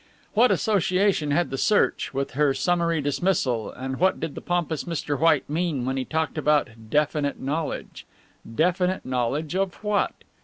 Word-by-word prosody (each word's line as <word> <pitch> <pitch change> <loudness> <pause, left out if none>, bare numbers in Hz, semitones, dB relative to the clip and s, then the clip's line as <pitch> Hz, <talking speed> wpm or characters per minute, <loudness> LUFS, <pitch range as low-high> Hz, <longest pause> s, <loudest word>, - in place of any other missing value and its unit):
What 240 +4 +5
association 190 -5 +2
had 165 +3 +1
the 135 - -3
search 210 - +2
with 135 0 -2
her 140 0 +2
summary 170 0 +1
dismissal 140 - 0
and 130 +1 -5
what 190 +2 +2
did 150 - -4
the - - -7
pompous 170 -4 -1
Mr. 150 -4 -2
White 160 -2 +3
mean 155 -4 -1
when 130 +1 -1
he 130 -1 -2
talked 160 0 -2
about 150 -4 +2 0.2
definite 150 +1 0
knowledge? 150 +3 -4 0.5
Definite 180 +4 +1
knowledge 130 +5 -1
of 190 -2 0
what? 210 -1 +1
155 Hz, 155 wpm, -25 LUFS, 140-175 Hz, 0.5 s, What